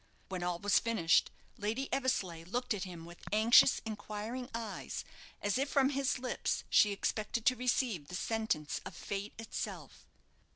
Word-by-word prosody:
When 185 -2 -3
all 175 -1 -1
was 205 +3 +3
finished, 220 -8 +3 0.3
Lady 225 +6 -1
Eversleigh 195 -11 0
looked 245 +6 -1
at 200 -2 -3
him 170 -3 -8
with 170 0 -12
anxious, 220 +5 +6
inquiring 215 +4 -5
eyes, 230 -1 -5 0.4
as 205 +4 +1
if 275 +1 0
from 275 -1 +4
his 275 -1 +1
lips 255 0 -2
she 210 - +6
expected 215 +2 -1
to 255 - +5
receive 240 - 0
the 180 - -6
sentence 220 -8 -1
of 185 - -8
fate 200 +3 -4
itself. 225 0 -6
215 Hz, 155 wpm, -33 LUFS, 190-250 Hz, 0.4 s, anxious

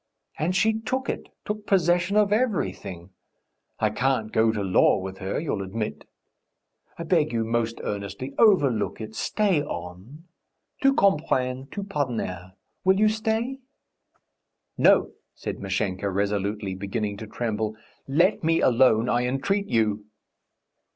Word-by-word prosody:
And 175 +4 0
she 220 +2 +2
took 260 +4 -2
it, - - -4 0.2
took 210 0 -4
possession 180 +1 +2
of 205 -1 +4
everything.... 95 - -2 0.7
I 110 -1 +2
can't 125 -2 0
go 110 0 +3
to 105 -2 -3
law 95 -1 +4
with 95 0 -6
her, 95 -1 -2
you'll 140 -11 -2
admit.... 105 +3 -4 0.9
I 170 - -4
beg 160 -2 +2
you 115 -1 0
most 115 0 -1
earnestly, 105 +7 -5
overlook 145 - +3
it... 110 -1 -7
stay 195 - +1
on. 115 - -8 0.6
Tout 275 0 +4
comprendre, 135 -8 +1
tout 200 -1 -6
pardonner. 115 - -3 0.3
Will 190 +1 +4
you 215 0 +5
stay?" 220 +4 -1 1.2
"No!" - - +4 0.2
said - - -5
Mashenka 95 0 -2
resolutely, 100 0 -1
beginning 100 +2 -3
to 110 - -8
tremble. 110 -1 -2 0.3
"Let 170 +9 +2
me 165 +1 +3
alone, 120 -2 +4
I 120 0 +1
entreat 195 +11 0
you!" 110 - 0
125 Hz, 130 wpm, -25 LUFS, -, 1.2 s, you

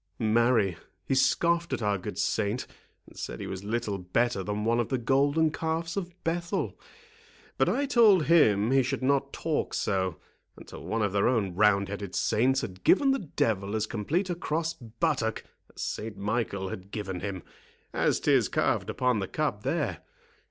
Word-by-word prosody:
"Marry, 110 -4 +2 0.3
he - - 0
scoffed 170 +6 +2
at - - -2
our 100 -2 +1
good - - -6
saint, 110 +3 0 0.4
and - - -18
said - - -6
he - - -5
was 95 0 -6
little 105 -2 -2
better 100 +4 0
than 105 +2 -3
one 115 +1 +2
of 120 - -1
the 130 - 0
golden 140 +6 +2
calves 165 +1 -2
of 180 -3 -3
Bethel. 170 +1 -2 0.8
But - - +4
I 285 - +1
told 220 - +5
him 110 -10 +4
he 135 0 +5
should 135 +1 -2
not 140 +1 +1
talk 160 -2 -2
so, 95 -4 -1 0.4
until - - -11
one 115 -1 -1
of 100 - 0
their 100 -1 +3
own 110 -7 +1
roundheaded 100 0 +1
saints 130 +4 +2
had 95 -2 -7
given 275 +6 +5
the 270 - +1
devil 110 - -1
as 110 -1 0
complete 155 - -1
a - - +1
cross 165 -1 -2
buttock 115 -1 -2 0.3
as - - -7
Saint 110 -2 -4
Michael 100 -2 -2
had 95 +1 -8
given 100 -4 -4
him, 95 -2 -5 0.5
as - - +1
'tis - - +3
carved - - 0
upon 125 -4 +1
the 95 - -3
cup 150 -9 -2
there. - - -1
115 Hz, 175 wpm, -28 LUFS, 100-155 Hz, 0.8 s, told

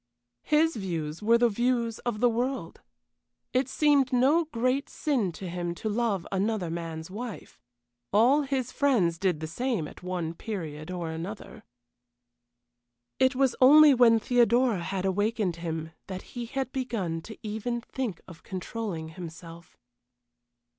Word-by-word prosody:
His 315 +1 +2
views 165 -5 -4
were 230 +2 +5
the 240 0 +4
views 235 0 0
of 230 -3 -3
the 245 - +6
world. 250 +4 -3 0.7
It 255 +1 +1
seemed 285 -3 +3
no 275 +7 +4
great 255 0 -1
sin 250 - 0
to 185 - -7
him 175 0 -3
to 215 - -3
love 210 -4 0
another 195 -3 -1
man's 165 0 -5
wife. 220 - -7 0.5
All 250 +8 +5
his 265 -3 -2
friends 195 - +2
did 180 -5 0
the - - -2
same 205 - -2
at - - -13
one 180 -3 -3
period 165 -6 -6
or 175 -3 -4
another. 175 +6 -7 1.6
It 260 0 +4
was 265 -2 +2
only 295 +3 +9
when 235 -3 +6
Theodora 240 -2 +3
had 190 +2 -3
awakened 205 -1 0
him 160 -1 -4 0.2
that 185 -1 -6
he 240 -2 -5
had 265 0 -3
begun 215 -11 -2 0.2
even 220 +3 -3
to - - -26
think 240 -10 -3
of 170 -2 -12
controlling 185 -3 -5
himself. 165 0 -10
215 Hz, 140 wpm, -28 LUFS, 175-250 Hz, 1.6 s, only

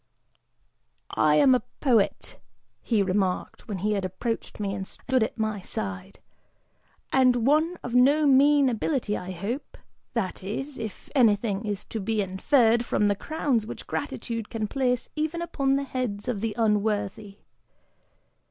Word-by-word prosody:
"I 150 -1 +3
am 260 - +6
a 250 - +3 0.2
poet," 235 -8 +1 0.4
he 220 -4 +1
remarked, 190 +2 -1
when 205 -4 -3
he 210 +4 -1
had 200 -2 -1
approached 200 +7 -4
me 200 -2 -2
and 190 0 -5
stood 260 -1 -1
at 220 - -1
my 215 -2 -1
side, 195 -1 -6 0.9
"and 250 -3 +4
one 315 +5 +3
of 245 - -5
no 280 +5 +5
mean 285 +1 +5
ability, 240 -2 0
I 180 - -6
hope, 200 - -5 0.4
that 190 -5 -2
is, 265 +8 -5
if 220 -4 -7
anything 215 -5 +2
is 205 -1 -3
to 225 - -5
be 215 +2 -1
inferred 225 +5 +3
from 210 -3 +1
the 205 - +2
crowns 265 -3 -1
which - - -7
gratitude 230 -3 -4
can 220 -2 -2
place 250 0 0
even 315 +2 -1
upon 275 -5 0
the 280 - 0
heads 250 -6 -3
of 230 -6 -2
the 220 -2 -2
unworthy! 210 -2 0
225 Hz, 150 wpm, -26 LUFS, 200-260 Hz, 0.9 s, am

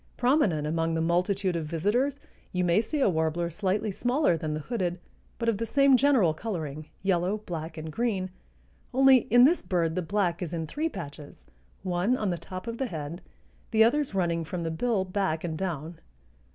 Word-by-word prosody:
Prominent 245 - +2
among 165 +1 0
the - - 0
multitude 180 +3 +1
of 160 -2 -2
visitors 215 - 0 0.3
you 180 0 0
may 175 +4 +3
see 280 +6 -3
a - - +4
warbler 170 0 0
slightly 205 +4 -1
smaller 245 - +1
than 155 -1 -3
the 155 - -4
hooded 180 -3 -2 0.4
but 230 - -3
of 220 -3 +1
the 230 - -1
same 275 +2 +5
general 250 - +4
coloring, 155 -6 -5 0.2
yellow, 190 +1 +1
black 165 -6 -6
and 155 0 -6
green, 195 -2 -1 0.6
only 265 -2 +6
in 245 +2 +7
this 325 +7 +5
bird 170 -3 0
the 185 - -1
black 180 -1 -1
is 175 -2 -4
in 165 -1 -2
three 305 - -2
patches, 150 - -9 0.4
one 185 +7 +1
on 210 -5 -1
the 175 - -2
top 185 +3 -8
of 230 0 -5
the 265 - 0
head, 160 -2 -6 0.5
the 220 -1 +5
others 260 0 +1
running 170 -3 0
from 170 +2 -4
the 165 - -2
bill 195 +3 0
back 185 -4 -1
and 165 -2 -3
down. 165 -2 -4
185 Hz, 190 wpm, -27 LUFS, 165-230 Hz, 0.6 s, in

